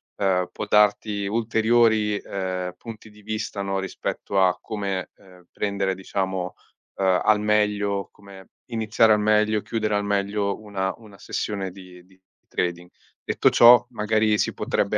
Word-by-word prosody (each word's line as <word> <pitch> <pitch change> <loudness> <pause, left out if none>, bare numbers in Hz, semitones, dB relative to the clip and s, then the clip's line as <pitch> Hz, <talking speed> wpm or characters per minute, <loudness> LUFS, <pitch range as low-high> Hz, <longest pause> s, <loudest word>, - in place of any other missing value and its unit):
ehm, 90 -2 0
può 105 - -5
darti 105 0 +2
ulteriori, 110 -1 +2
ehm, 95 -2 -4
punti 110 -2 -11
di 105 0 -18
vista, 110 -1 -4
no, 100 0 -2
rispetto 95 0 -2
a 90 -1 +3
come, 100 -3 -4
ehm, 90 -2 -19
prendere 100 -2 -1
diciamo, 95 -1 -3 0.4
ehm, 95 -2 +2
al 110 -1 +4
meglio, 105 -2 0
come 100 -1 -15 0.2
iniziare 110 -1 +3
al 105 - +2
meglio, 105 0 +2
chiudere 110 -2 -2
al 105 - 0
meglio 100 0 -1
una 95 -3 -3
una 105 -4 -16
sessione 100 -2 -3
di 90 -1 -14
di 95 +1 -25 0.3
trading. 90 0 -3 0.3
Detto - - +2
ciò, 120 0 +7
magari 110 -1 +1
si - - 0
potrebbe - - 0
100 Hz, 145 wpm, -24 LUFS, 95-110 Hz, 0.4 s, ciò